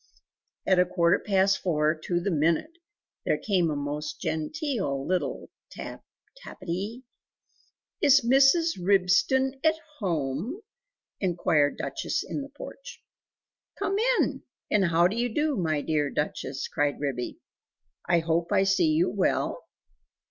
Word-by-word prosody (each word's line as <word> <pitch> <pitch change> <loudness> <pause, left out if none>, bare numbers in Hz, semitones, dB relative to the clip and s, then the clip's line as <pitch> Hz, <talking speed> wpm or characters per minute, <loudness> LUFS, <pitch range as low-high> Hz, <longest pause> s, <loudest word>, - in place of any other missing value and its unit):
At 190 -1 +4
a 180 - +5
quarter 170 -1 +2
past 195 -1 +2
four 155 -3 +1
to 175 -1 0
the 190 +3 -2
minute, 170 - 0 0.4
there - - +1
came 185 -6 +1
a 150 - -1
most 145 +1 -4
genteel 175 - -2
little 185 +2 -2 0.2
tap - - -8 0.4
tappity. 195 +7 -5 1.0
"Is 280 -1 +6
Mrs. 270 - +4
Ribston 205 +8 +2
at 315 0 +4 0.2
home?" 170 - -2 0.6
inquired 165 -6 +1
Duchess - - -2
in - - -3
the 280 - -8
porch. - - -11 0.7
"Come 395 0 -1 0.2
in! - - 0 0.3
and 205 -2 +3
how 170 0 +4
do 200 - -4
you 240 +1 0
do, 295 +4 0
my 155 -7 0
dear 150 -2 0
Duchess?" 140 -2 -3
cried 145 -1 -1
Ribby. 135 -4 -3 0.7
"I 170 -1 +4
hope 165 +2 -1
I 195 -2 +4
see 195 - +3
you 335 +4 +3
well?" - - -1
185 Hz, 130 wpm, -27 LUFS, 160-265 Hz, 1.0 s, Is